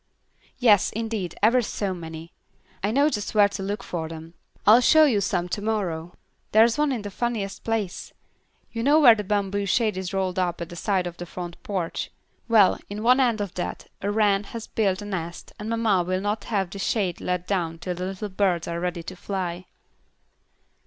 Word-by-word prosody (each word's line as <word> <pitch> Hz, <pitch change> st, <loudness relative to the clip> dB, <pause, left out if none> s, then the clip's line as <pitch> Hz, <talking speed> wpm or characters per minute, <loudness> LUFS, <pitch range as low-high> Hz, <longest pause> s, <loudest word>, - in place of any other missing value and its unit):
"Yes, 220 Hz, -7 st, +5 dB
indeed, 220 Hz, -6 st, -3 dB
ever 240 Hz, +4 st, +5 dB
so 200 Hz, -3 st, -2 dB
many. 165 Hz, -1 st, -8 dB, 0.5 s
I 205 Hz, -, +2 dB
know 280 Hz, +6 st, +3 dB
just 210 Hz, -8 st, -3 dB
where 205 Hz, -1 st, +6 dB
to 195 Hz, -, -6 dB
look 205 Hz, +4 st, -3 dB
for 160 Hz, -2 st, -4 dB
them. 165 Hz, 0 st, -9 dB, 0.3 s
I'll 220 Hz, +4 st, +8 dB
show 310 Hz, +5 st, +6 dB
you 225 Hz, -9 st, +2 dB
some 180 Hz, -3 st, 0 dB
to 205 Hz, -, -3 dB
morrow. 180 Hz, -6 st, -2 dB, 0.4 s
There's 225 Hz, +2 st, +6 dB
one 300 Hz, -1 st, +1 dB
in 235 Hz, -5 st, -2 dB
the 205 Hz, -, -6 dB
funniest 215 Hz, -3 st, -3 dB
place. 220 Hz, -5 st, -2 dB, 0.6 s
You 230 Hz, -, -3 dB
know 290 Hz, +6 st, +5 dB
where 250 Hz, -7 st, +9 dB
the 210 Hz, -2 st, -3 dB
bamboo 200 Hz, 0 st, -1 dB
shade 215 Hz, 0 st, +1 dB
is 185 Hz, -1 st, -4 dB
rolled 190 Hz, -1 st, -1 dB
up 175 Hz, -2 st, -1 dB
at 170 Hz, -1 st, -5 dB
the 175 Hz, -, -9 dB
side 190 Hz, +1 st, 0 dB
of 175 Hz, -1 st, -6 dB
the 175 Hz, -, -7 dB
front 175 Hz, 0 st, -7 dB
porch: 185 Hz, -5 st, -3 dB, 0.4 s
well, 220 Hz, -5 st, +5 dB
in 210 Hz, +2 st, -5 dB
one 250 Hz, +3 st, +5 dB
end 235 Hz, -5 st, +2 dB
of 200 Hz, -3 st, -4 dB
that 180 Hz, -, -5 dB
a 200 Hz, -, -1 dB
wren 205 Hz, -1 st, +2 dB
has 230 Hz, +2 st, -7 dB
built 200 Hz, -2 st, 0 dB
a -, -, -7 dB
nest, 175 Hz, -4 st, -5 dB
and 210 Hz, +1 st, -5 dB
mamma 225 Hz, -5 st, +2 dB
will 185 Hz, +2 st, -1 dB
not 205 Hz, +1 st, -2 dB
have 195 Hz, -5 st, -1 dB
the 200 Hz, -, -7 dB
shade 195 Hz, -3 st, -1 dB
let 180 Hz, -1 st, -2 dB
down 170 Hz, -4 st, -1 dB
till 180 Hz, +2 st, -4 dB
the 180 Hz, +1 st, -4 dB
little 195 Hz, +2 st, -4 dB
birds 185 Hz, -3 st, 0 dB
are 170 Hz, 0 st, -3 dB
ready 175 Hz, -1 st, -3 dB
to 185 Hz, -, -7 dB
fly." 180 Hz, -2 st, -4 dB
200 Hz, 200 wpm, -25 LUFS, 180-220 Hz, 0.6 s, where